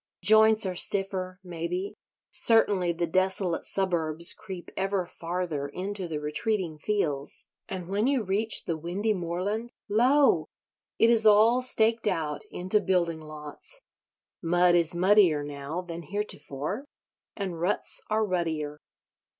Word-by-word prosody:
Joints 220 +2 +6
are 185 - -2
stiffer, 190 -1 +1
maybe; 180 +2 -4 0.4
certainly 225 - +4
the 170 +1 -2
desolate 185 0 0
suburbs 170 -3 +1
creep 185 -4 -9
ever 195 -1 -1
farther 170 -4 -4
into 190 +4 -4
the 160 -2 -4
retreating 160 +2 -2
fields; 150 -8 -1 0.2
and 185 -2 -5
when 205 +5 0
you 270 -4 +1
reach 210 +3 0
the 165 - -1
windy 185 +7 -1
moorland, 195 +6 -3 0.2
lo! 240 - +3 0.5
it 230 - +5
is 225 -2 +5
all 220 +4 +5
staked 230 -3 +2
out 160 -6 -1
into 185 +4 0
building 170 -4 0
lots. 155 - -7 0.6
Mud 175 +1 +3
is 170 0 +3
muddier 180 -4 +4
now 145 +4 -5
than 170 -1 -7
heretofore; 170 - -5 0.5
and 185 -5 -4
ruts 185 +4 -1
are 215 0 +1
ruttier. 160 -6 -2
185 Hz, 125 wpm, -27 LUFS, 165-210 Hz, 0.6 s, Joints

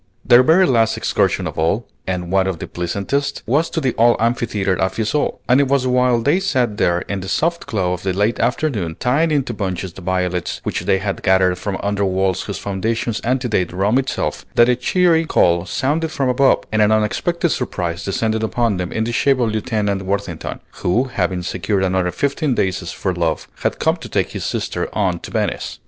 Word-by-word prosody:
Their 120 0 +7
very 165 +8 +5
last 115 -6 +2
excursion - - 0
of - - -5
all, 95 +9 +1 0.2
and 90 -2 -3
one 95 0 +3
of 95 -3 -2
the - - -6
pleasantest, 100 +11 -2
was 150 +7 +1
to - - -2
the 130 -5 0
old 120 +1 +5
amphitheatre 105 -5 0
at 95 - +1
Fiesole; 115 +7 0
and 130 +3 +5
it 140 - +1
was 135 -1 +1
while 125 -1 +3
they 145 +10 +2
sat 130 - 0
there 90 -4 +2
in 100 - -4
the 95 - -7
soft 170 - 0
glow 95 -5 0
of 90 - -5
the 95 - -1
late 105 +5 0
afternoon, 110 - -1
tying 145 +7 +2
into 140 -5 0
bunches 95 -3 -4
the 95 - -11
violets 90 -1 -1
which - - -2
they 95 - +3
had 95 0 -3
gathered 95 -1 +3
from 100 -2 -3
under 100 0 0
walls 95 -1 0
whose 100 - -5
foundations 110 +3 -2
antedate 120 -7 0
Rome 100 +8 +2
itself, 135 - -2
that 120 - +6
a 125 - +4
cheery 165 +6 +2
call 85 - +2
sounded 155 - 0
from 135 -4 -1
above, 130 +2 +3
and 110 0 +2
an 105 0 +4
unexpected 170 - +1
surprise 90 -8 -3
descended 110 +3 -1
upon 110 -2 0
them 90 -1 -3
in 110 - -1
the 115 - -2
shape 135 +2 +2
of 115 -3 +1
Lieutenant 105 -3 -1
Worthington, 95 +1 -4 0.2
who 115 +8 +2
having 90 -1 -1
secured 95 +2 -1
another 95 -1 +1
fifteen 140 - -1
days' 95 -4 -1
furlough, 85 -4 -1 0.2
had - - -1
come - - +1
to - - -10
take - - 0
his - - -5
sister - - -2
on - - 0
to - - -9
Venice. - - -2
105 Hz, 200 wpm, -19 LUFS, 95-125 Hz, 0.2 s, Their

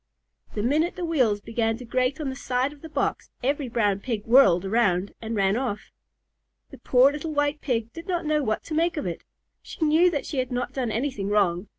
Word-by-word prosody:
The 210 - -1
minute 310 +8 +1
the 360 -2 -3
wheels 250 -11 +1
began 225 0 -1
to 250 - -9
grate 255 +4 0
on 295 -3 -2
the - - -7
side 260 +1 -1
of 290 - -18
the 320 - -9
box, - - -2
every 280 0 0
Brown 205 -4 +1
Pig 215 -1 -4
whirled 200 -8 +5
around 195 -3 +1
and 225 0 -4
ran 195 -1 +2
off. 235 -4 -3 0.8
The - - -12
poor 255 +2 +4
little 305 +2 -5
White 290 +1 0
Pig 230 -3 -2
did 330 - -9
not 350 -3 -1
know 305 0 +1
what 215 -5 -1
to 320 - -7
make 330 +2 +1
of 295 - -2
it. 170 -2 -4 0.4
She 320 - -3
knew 320 +4 +5
that 295 -5 -3
she 280 - -3
had 255 0 -2
not 245 0 -2
done 255 -4 -2
anything 225 -4 -2
wrong. 195 -2 +1
250 Hz, 220 wpm, -25 LUFS, 215-290 Hz, 0.8 s, whirled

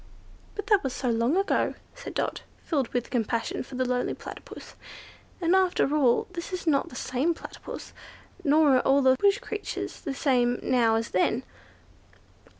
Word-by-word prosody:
"But 410 - -4
that 405 -1 +3
was 265 -2 -2
so 250 -2 -1
long 235 +8 +2
ago," 390 - +1 0.2
said - - -9
Dot, - - -1 0.2
filled 280 -7 0
with 245 0 -3
compassion 230 -1 -1
for 260 - -9
the 255 0 0
lonely 250 0 -1
Platypus; - - -10 0.7
"and, 345 0 +3
after 365 -6 +2
all, 260 -6 +3
this 340 +2 -6
is 365 -1 -4
not 290 -4 +2
the - - -12
same 260 +7 0
Platypus, - - -9 0.5
nor 290 -2 +5
are - - +3
all 275 +2 +3
the 260 0 +6
bush 400 0 +4
creatures 425 - -5
the 275 - -4
same 245 -4 +2
now 235 -3 +3
as 225 0 -1
then." 225 +7 +1
270 Hz, 165 wpm, -27 LUFS, 245-335 Hz, 0.7 s, the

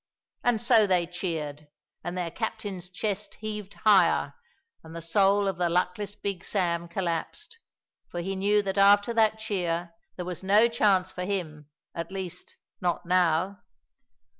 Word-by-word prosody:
And 240 -2 +2
so 230 -2 +5
they 180 -2 +2
cheered, 160 -4 -4 0.4
and 175 +2 -4
their 175 -2 -2
captain's 190 -2 -4
chest 205 +2 -3
heaved 210 -2 -6
higher, 210 -3 +4 0.5
and 160 0 -11
the - - -4
soul 195 +4 +3
of 190 -3 -1
the 175 -1 +2
luckless 180 +4 -1
Big 200 -3 -4
Sam 170 -4 0
collapsed, 190 - -3 0.5
for 175 - -5
he 190 +3 -3
knew 205 +2 +2
that 195 0 -1
after 205 +3 +5
that 220 -1 +3
cheer 175 -5 -2 0.2
there 180 - -5
was 180 -1 -5
no 205 +4 +5
chance 200 -5 +2
for 180 - -5
him; 160 -7 -4 0.2
at 170 +1 -5
least, 190 -3 -6 0.3
not 175 -1 -1
now. 180 +2 +2
190 Hz, 150 wpm, -27 LUFS, 175-205 Hz, 0.5 s, so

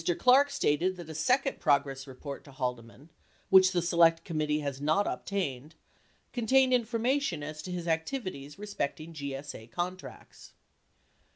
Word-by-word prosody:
Clarke 270 +3 +5
stated 185 - +1
that 170 -3 -8
a - - -6
second 255 - +1
progress 140 -3 +1
report 135 +2 -8
to 140 - -13
Haldeman 125 +2 -5 0.2
— - - -35
which 190 -1 +7
the 175 -2 0
Select 170 -1 +4
Committee 155 -2 -1
has 140 -2 -4
not 155 +8 +2
obtained 155 -7 -3 0.3
— - - -38
contained 260 +2 +3
information 235 - 0
as 155 +1 -6
to 180 - -7
his 175 -1 -4
activities 160 - -3
respecting 165 -6 -4
GSA 140 -5 -7
contracts. 180 +6 -7
165 Hz, 145 wpm, -30 LUFS, 145-200 Hz, 0.3 s, which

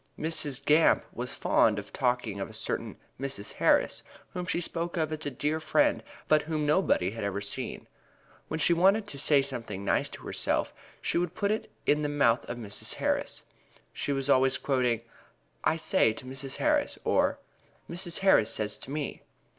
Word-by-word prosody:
Mrs. 145 -4 0
Gamp 155 +2 +4
was 125 +1 -4
fond 105 -2 +3
of 100 -1 -7
talking 125 -6 0
of 95 - -4
a - - -12
certain - - -3 0.2
"Mrs. 135 -6 -3
Harris," - - +2 0.3
whom 180 0 -4
she - - 0
spoke 170 0 -3
of 155 -2 0
as 155 -1 -3
a - - +1
dear 150 +4 -1
friend, 160 - +2 0.3
but 155 -1 +4
whom 155 -1 -2
nobody 145 - +2
else 105 - -9
had - - -4
ever 100 0 -2
seen. 105 +5 -4 0.6
When 160 - -3
she 170 - +4
wanted 195 +5 +4
to 140 - -7
say 140 -1 +4
something 115 -7 -5
nice - - +1
of - - -8
herself - - 0 0.3
she - - +1
would 175 0 -2
put 200 0 0
it 215 - -2 0.2
in 150 +1 +3
the 145 - -1
mouth 135 -5 +2
of 120 - -4
Mrs. 105 -3 -5
Harris. - - -1 0.5
She - - -2
was 135 -1 -1
always 130 -1 +4
quoting, 125 -4 +1 0.6
"I 160 - +2
says 160 - +2
to - - -8
Mrs. 135 +1 -4
Harris," 300 -1 +1
or - - +2 0.5
"Mrs. 175 +1 0
Harris 190 - +5
says 105 -1 +1
to - - -8
me." 145 0 -4
140 Hz, 185 wpm, -29 LUFS, 120-160 Hz, 0.6 s, Harris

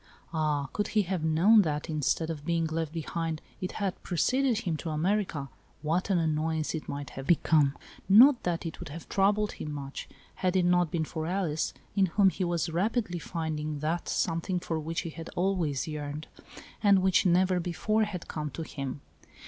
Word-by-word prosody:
Ah, 150 -3 0
could 205 - -1
he 210 - +5
have 185 -3 -2
known 175 +8 +6
that, 150 -4 -2
instead 160 +1 0
of 150 -3 -6
being 165 +1 0
left 160 -1 -2
behind, 165 0 -3 0.2
it 185 - -3
had 195 -3 -3
preceded 250 +6 +1
him 170 -6 -1
to 160 - -5
America, 160 -2 0 0.4
what 165 +6 0
an 190 - +3
annoyance 160 -1 0
it 160 - -5
might 140 -2 -5
have 135 0 -7
become! 150 -4 +4 0.3
Not 245 +6 +8
that 175 -1 -2
it 165 - -5
would - - -7
have 160 +3 -8
troubled 205 +2 +2
him 150 - -6
much, 140 -1 -6 0.3
had 185 0 0
it 185 -2 +3
not 175 -1 +3
been 160 0 -1
for 160 0 -4
Alice, 175 -4 -1 0.2
in 195 -2 +4
whom 190 +2 +4
he 190 - -3
was 175 -1 0
rapidly 190 +1 0
finding 155 -3 -3
the 160 +4 -1
something 175 +2 -1
for 165 -2 -3
which 165 +2 -2
he 165 - -6
had 165 0 -8
always 175 -8 0
yearned, 150 0 -5 0.6
and 200 -3 +5
which, 190 -2 +4
never 180 +1 +3
before, 215 +6 0
had 185 -5 -6
come 150 -1 -4
to 165 - -6
him. 140 -2 -5
165 Hz, 185 wpm, -29 LUFS, 155-185 Hz, 0.6 s, Not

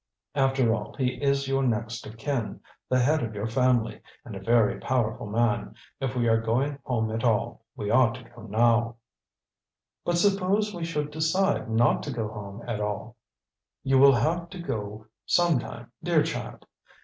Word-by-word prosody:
After 135 -4 +2
all, 105 -1 -5
he 130 -1 -1
is 140 -1 +1
your 135 0 +1
next 115 -2 -2
of 110 +1 -11
kin, 120 -2 -3 0.3
the 130 - +3
head 145 +5 +3
of 110 -2 -4
your 105 +1 -3
family, 125 0 +1 0.2
and 115 - -8
a - - -5
very 115 +1 +2
powerful 120 -5 -1
man. 115 +1 0 0.2
If 135 -1 -2
we 120 -1 +1
are 115 0 +3
going 135 +6 0
home 110 -4 -1
at 115 +1 -3
all, 115 -1 0
we 105 - -3
ought 120 -1 +4
to - - -10
go 120 - -15
now." 115 +2 +2 1.1
"But 175 0 0
suppose 200 +2 +2
we 170 -2 -4
should 150 -3 -2
decide 160 - +1
not 115 +1 +3
to 145 - -5
go 115 -4 -3
home 105 +1 -8
at 115 -3 -2
all?" 105 -1 -4 0.7
"You 135 -1 +3
will 140 0 +8
have 170 +9 0
to 185 - -9
go 110 -8 -5 0.2
some 170 -6 +3
time, 120 0 -9
dear 170 -3 +3
child. 160 0 -5
120 Hz, 175 wpm, -27 LUFS, 110-145 Hz, 1.1 s, will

